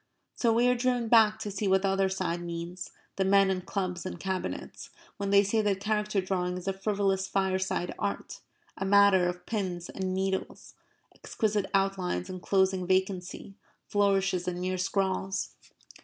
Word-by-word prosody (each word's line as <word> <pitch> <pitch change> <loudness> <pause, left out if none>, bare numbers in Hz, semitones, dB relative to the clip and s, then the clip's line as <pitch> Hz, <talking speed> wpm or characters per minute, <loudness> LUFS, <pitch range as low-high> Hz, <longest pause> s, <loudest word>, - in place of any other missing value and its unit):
So 235 - +1
we 235 +2 +3
are 250 - +5
driven 245 -2 0
back 220 -2 +6
to 210 - -4
see 200 +1 -2
what 190 0 +3
the 195 - +2
other 195 0 +2
side 185 -2 -2
means 175 +1 -6 0.3
the 195 - +2
men 195 0 +4
in 185 -1 -1
clubs 180 -2 -3
and 185 -2 -6
Cabinets 190 0 -4 0.3
when 200 0 -2
they 200 0 +6
say 215 +3 +1
that 200 -2 0
character 210 0 0
drawing 180 -1 -2
is 180 - -8
a 195 - +1
frivolous 195 -1 0
fireside 190 -2 -1
art, - - -3 0.4
a - - -4
matter 195 -2 +5
of 180 0 -7
pins 185 -6 -3
and 190 -1 -3
needles, 190 0 -3 0.4
exquisite 210 -3 -1
outlines 190 - 0
enclosing 190 0 +1
vacancy, 185 0 -1 0.3
flourishes, 195 -3 +1
and 175 -1 -2
mere 185 0 -2
scrawls. 190 0 -1
190 Hz, 160 wpm, -29 LUFS, 185-200 Hz, 0.4 s, back